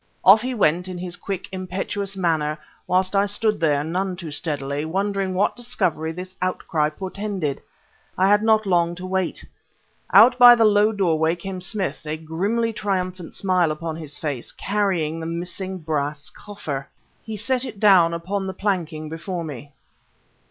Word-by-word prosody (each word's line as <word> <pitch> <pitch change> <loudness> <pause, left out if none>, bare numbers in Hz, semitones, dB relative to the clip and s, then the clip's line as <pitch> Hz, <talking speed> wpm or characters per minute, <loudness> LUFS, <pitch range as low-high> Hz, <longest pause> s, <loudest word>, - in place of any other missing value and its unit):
Off 200 +3 +8
he 255 +1 -3
went, 180 -3 +2
in 185 -1 -6
his 175 0 -4
quick, 195 -2 -5
impetuous 190 +1 -4
manner, 155 -4 0 0.3
whilst 185 +2 +1
I 200 +1 +3
stood 210 +1 0
there, 145 -3 +2
none 180 +4 -2
too 170 -4 -7
steadily, 145 -1 -2
wondering 195 +3 -1
what 200 +3 +2
discovery 185 -10 -1
this 185 +2 -8
outcry 165 -4 0
portended. 190 -3 -4 0.6
I 190 - +4
had 205 +1 +5
not 220 -1 +3
long 175 -2 +2
to 180 +1 -7
wait. 185 -1 -2 0.7
Out 245 +2 +7
by 245 -1 +10
the 230 -1 +4
low 210 0 +4
doorway 165 -5 +1
come 185 +1 -6
Smith, 195 +1 -3
a 155 +1 -2
grimly 200 +9 -1
triumphant 185 -4 -3
smile 185 -4 +2
upon 155 +1 -4
his 155 -3 -6
face, 140 -6 -4
carrying 185 -6 -1
the 160 - -5
missing 180 +3 -4
brass 150 -3 -3
coffer! 150 -10 -6 0.3
He 220 -1 -6
set 255 +4 0
it 230 -6 -7
down 190 -5 +6
upon 190 +4 -3
the 190 - -5
planking 170 -6 -2
before 170 +3 -5
me. 145 -2 -8
185 Hz, 160 wpm, -23 LUFS, 160-200 Hz, 0.7 s, by